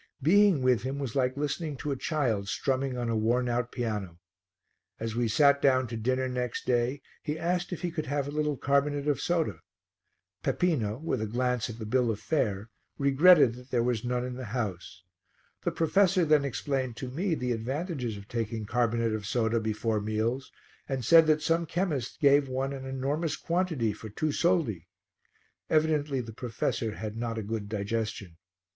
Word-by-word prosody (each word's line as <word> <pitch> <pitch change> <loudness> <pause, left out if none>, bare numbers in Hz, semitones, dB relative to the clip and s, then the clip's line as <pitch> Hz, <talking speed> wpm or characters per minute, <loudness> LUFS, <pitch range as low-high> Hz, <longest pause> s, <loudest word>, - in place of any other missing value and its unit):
Being 190 -2 +5
with 125 -4 +3
him 135 +2 -3
was 135 -5 -4
like 130 0 +1
listening 150 +1 -2
to 145 - -3
a - - 0
child 125 -9 -1
strumming 130 0 -1
on 120 -1 -2
a 115 - 0
worn 120 +3 +1
out 120 0 -1
piano. 105 -8 -3 0.8
As 115 0 -3
we 120 0 +1
sat 140 +4 +4
down 130 -2 +4
to 115 - -4
dinner 130 +3 0
next 125 -2 -3
day 125 +3 0 0.2
he 150 +1 -3
asked 175 +2 -1
if 180 - -5
he 175 - -1
could 155 -2 -4
have 145 0 -1
a - - -4
little 150 -1 -1
carbonate 140 +2 +1
of 145 - +1
soda. 160 - 0 0.8
Peppino, 120 -12 0
with 155 -6 -2
a 110 - -1
glance 125 +1 0
at 115 - -7
the 110 - -6
bill 120 +2 +2
of 110 -2 -2
fare, 110 -8 -1 0.3
regretted 140 -1 +6
that 125 +2 -13
there 120 -2 +1
was 120 -3 0
none 125 0 -1
in 125 - -4
the 125 0 -6
house. 100 -6 -4 0.6
The - - -1
professor 185 +2 +3
then 150 -2 +4
explained 130 -3 -2
to 130 -2 -5
me 170 +5 0
the 125 -4 -2
advantages 125 - -3
of 100 0 -11
taking 115 -2 -3
carbonate 115 0 +1
of 105 -2 -4
soda 115 0 +1
before 110 0 -1
meals 110 +5 -2 0.4
and 130 -3 -2
said 165 +3 +7
that 155 0 +3
some 165 +1 +1
chemists 155 -8 -2
gave 140 -1 +4
one 135 +2 -2
an 135 -1 -6
enormous 140 +5 -1
quantity 165 - 0
for 110 +1 -9
two 155 +9 -1
soldi. 145 - +1 0.8
Evidently 155 -3 +2
the 115 -2 -9
professor 115 -1 -2
had 110 -1 -5
not 115 0 -3
a 110 - -2
good 105 -1 -4
digestion. 105 -4 -3
130 Hz, 180 wpm, -29 LUFS, 115-150 Hz, 0.8 s, said